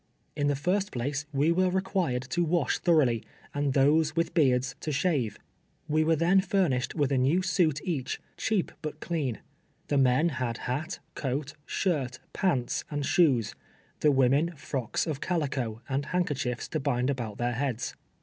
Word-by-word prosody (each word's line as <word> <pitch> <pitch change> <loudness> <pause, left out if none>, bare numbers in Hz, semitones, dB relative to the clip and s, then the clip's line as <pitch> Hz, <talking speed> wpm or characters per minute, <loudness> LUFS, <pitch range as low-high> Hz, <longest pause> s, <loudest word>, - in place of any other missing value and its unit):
In 145 - +1
the 145 - +2
first 190 +8 0
place 140 +4 -2
we 145 +3 +2
were 185 +2 +3
recpiired 180 -9 -1
to 175 - +1
wash 170 +1 +1
thorough 165 -5 +4
ly, 115 -2 0 0.3
and 145 -1 0
those 150 +3 +3
with 165 0 0
beards, 130 -5 +3
to 155 - -3
shave. 140 - 0 0.5
"We 155 0 +2
were 160 +1 +3
then 175 +5 +4
furnished 180 -10 0
M'ith 145 -3 +1
a 135 - +3
new 150 +9 +3
suit 175 -6 +2
each, 145 -8 -2 0.2
cheap, 215 -5 0
but 155 -1 -5
clean. 150 -10 -2 0.5
Tlie 145 -2 +3
men 130 +6 +4
had 125 -5 -2
hat, 150 +9 -2 0.2
C(^at, 140 +1 -2
shirt, 135 -9 -1 0.2
pants 135 -11 0
and 145 -2 -2
shoes; 145 - +3 0.5
the 150 - +4
women 140 +6 +3
frocks 135 -5 -2
of 150 -4 -3
calico, 130 -9 -2
and 140 +1 -1
handkerchiefs 145 -9 -1
to 155 - -1
bind 135 -2 +1
about 115 -6 -4
their 120 0 0
heads. 125 -2 -2
145 Hz, 165 wpm, -28 LUFS, 130-170 Hz, 0.5 s, thorough